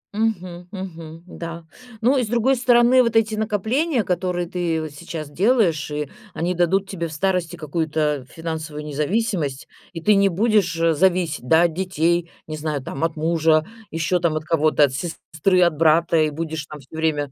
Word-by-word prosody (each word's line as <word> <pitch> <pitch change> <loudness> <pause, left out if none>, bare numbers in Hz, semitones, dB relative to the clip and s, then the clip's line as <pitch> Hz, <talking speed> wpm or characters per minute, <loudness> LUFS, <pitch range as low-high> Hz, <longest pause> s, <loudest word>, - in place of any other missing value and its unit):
Мгм 185 -5 -2
мгм, 165 -4 -8
да. 170 -2 -8 0.4
Ну 255 +5 +3
и 255 - +2
с - - -3
другой 240 +4 +2
стороны, 245 0 +5
вот 230 -2 0
эти 220 -1 +3
накопления, 220 - 0
которые 180 -1 -1
ты 170 -2 -1
вот 155 - -6
сейчас 155 0 -7
делаешь, 185 - +2
и 150 -1 -3 0.3
они 175 +3 -1
дадут 180 +3 +1
тебе 170 -4 -4
в 155 - -9
старости 180 +1 -1
какую-то 155 -3 -1
финансовую 155 -2 -6
независимость, 150 - -1 0.2
и 165 - -7
ты 210 +6 +4
не 200 -1 +4
будешь, 205 -2 +1
э, 165 0 +3
зависеть, 170 -5 +1
да, 160 +4 +5
от 170 -2 +1
детей, 170 -2 0 0.2
не 155 -1 -6
знаю, 150 -3 -3
там, 135 - -5
от 165 -1 0
мужа, 160 0 +2 0.2
еще 165 +2 0
там 165 -2 +1
от 155 - -2
кого-то, 155 -2 +3
от 135 - +3
сестры, 175 +4 -1
от 170 -2 +2
брата, 165 +1 +4
и 155 -1 +3
будешь 160 0 -4
там 150 - -9
всё 140 +3 -15
время 150 -3 -1
170 Hz, 180 wpm, -22 LUFS, 155-190 Hz, 0.4 s, стороны